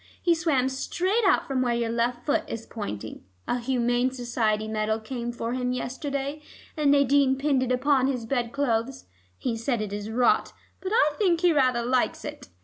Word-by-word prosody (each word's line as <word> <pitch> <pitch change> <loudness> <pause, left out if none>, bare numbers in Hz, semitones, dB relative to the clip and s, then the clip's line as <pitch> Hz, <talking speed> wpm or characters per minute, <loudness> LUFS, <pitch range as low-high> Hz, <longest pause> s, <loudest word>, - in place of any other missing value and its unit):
He 345 - +3
swam 315 -6 +1
straight 370 - -1
out - - +3
from 265 -2 -1
where 240 -2 +1
your 235 -1 -1
left 240 +1 -1
foot 285 - +1
is 225 0 -5
pointing. 110 - -6 0.2
A 245 - 0
Humane 245 0 +1
Society 235 -4 -1
medal 220 0 -1
came 240 +1 -4
for 235 0 -4
him 250 -1 -1
yesterday, 280 +3 -3 0.3
and 300 -3 +2
Nadine 280 -1 +4
pinned 275 -1 +1
it 255 -1 -1
upon 260 +1 +3
his 250 -4 -2
bed 240 -1 -1
clothes. 255 -2 -1 0.3
He 235 - -2
says 230 +1 -1
it 210 -2 -4
is 205 +1 -4
rot, 240 +2 +2 0.3
but 380 - -4
I 305 -9 +4
think 350 -5 +2
he 350 -2 +4
rather 255 -5 +2
likes 250 0 0
it. - - -7
250 Hz, 185 wpm, -26 LUFS, 235-280 Hz, 0.3 s, Nadine